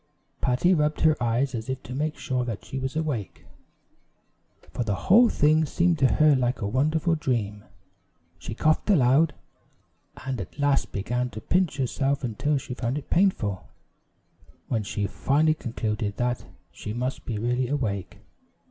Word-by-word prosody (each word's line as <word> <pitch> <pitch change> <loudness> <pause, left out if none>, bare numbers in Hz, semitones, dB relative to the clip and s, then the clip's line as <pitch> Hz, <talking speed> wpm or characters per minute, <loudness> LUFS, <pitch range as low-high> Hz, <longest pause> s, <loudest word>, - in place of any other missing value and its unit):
Patty 135 +8 +3
rubbed 150 -2 +1
her 155 -1 +5
eyes 120 +4 +1
as 115 +1 -5
if 130 0 -4
to 125 - -7
make 150 +3 -2
sure 130 -1 -1
that 115 -4 -5
she 135 - -5
was 130 +2 -4
awake; 145 - -3 1.3
for 120 - -2
the 105 -3 -1
whole 230 - +5
thing 155 +2 +3
seemed 170 +1 +1
to 135 -2 +4
her 155 -1 +5
like 125 -1 0
a 100 - -2
wonderful 155 - +1
dream. 110 -9 -2 0.8
She 110 - -6
coughed 155 - +1
aloud, 150 -2 +4 0.9
and 130 -4 -2
at 90 - -10
last 145 -1 +1
began 125 +5 -2
to 110 - -8
pinch 175 +4 0
herself 135 +2 0
until 130 +5 0
she 125 - -6
found 125 +2 -2
it 150 - -8
painful, 125 - +1 1.0
when 115 -3 0
she 105 0 -3
finally 150 +9 +2
concluded 110 -6 -3
that 120 0 -1 0.2
she 105 - -6
must 125 +3 -3
be 115 - -4
really 125 +3 0
awake. 110 -9 -3
130 Hz, 155 wpm, -26 LUFS, 115-150 Hz, 1.3 s, her